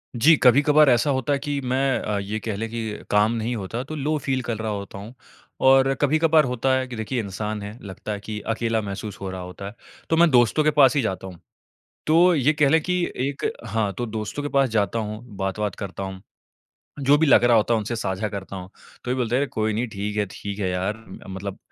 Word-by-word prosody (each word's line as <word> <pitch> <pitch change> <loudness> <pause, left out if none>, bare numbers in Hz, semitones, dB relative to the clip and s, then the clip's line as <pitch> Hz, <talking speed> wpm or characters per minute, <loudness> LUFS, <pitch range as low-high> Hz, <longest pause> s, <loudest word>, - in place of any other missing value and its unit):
जी 145 +8 +6
कभी-कभार 145 +4 +6
ऐसा 120 +3 +3
होता 130 +1 0
है 140 - 0
कि 145 0 -2
मैं 130 +1 +1
अ, 105 - -2
ये 100 +2 -4
कह 110 0 -4
लें 110 +3 -4
कि 110 -2 -5
काम 105 +2 +4
नहीं 115 +1 -2
होता 115 +4 -4
तो 155 +4 -7
लो 155 +1 -1
फ़ील 130 -1 -1
कल 120 -2 -3
रहा 110 0 -3
होता 100 -1 -6
हूँ। 105 +5 -9 0.5
और 135 0 +5
कभी-कभार 155 +2 +4
होता 125 +1 0
है 130 0 -2
कि 125 - -7
देखिए 110 +3 -3
इंसान 105 0 -4
हैं, 105 +2 -7
लगता 100 +1 -7
है 105 - -3
कि 105 +1 -6
अकेला 115 0 -1
महसूस 100 +1 -6
हो 95 - -4
रहा 95 0 -6
होता 90 +2 -8
है, 100 - -9 0.3
तो 160 - +2
मैं 170 0 +6
दोस्तों 120 +4 +4
के 155 - +3
पास 140 -2 +5
ही 140 - +3
जाता 95 -4 -3
हूँ। 90 -3 -11 0.7
तो 170 +3 +5
ये 145 0 +3
कह 150 -2 +3
लें 160 +3 +4
कि 180 +2 0
एक 135 +2 -2 0.2
हाँ, 105 -2 -1
तो 120 - -3
दोस्तों 110 +5 -4
के 145 - -2
पास 140 -2 +2
जाता 110 0 0
हूँ, 105 +1 -5
बात-वात 95 +1 -2
करता 100 -1 -6
हूँ। 95 0 -6 0.8
जो 140 +1 +5
भी 160 - +3
लग 130 - +6
रहा 120 -1 +5
होता 115 +2 +3
है - - +2
उनसे 110 +2 -3
साझा 100 -1 -2
करता 100 -1 -7
हूँ। 90 0 -8 0.3
तो 125 - -3
ये - - +2
बोलते 120 -1 0
हैं 140 0 0
कोई 110 0 -1
नहीं 115 +4 -1
ठीक 105 0 -4
है, 105 - +2
ठीक 100 +1 -6
है 100 -3 -1
यार, 95 +4 -2 0.3
मतलब 95 +1 -6
115 Hz, 235 wpm, -23 LUFS, 105-135 Hz, 0.8 s, जी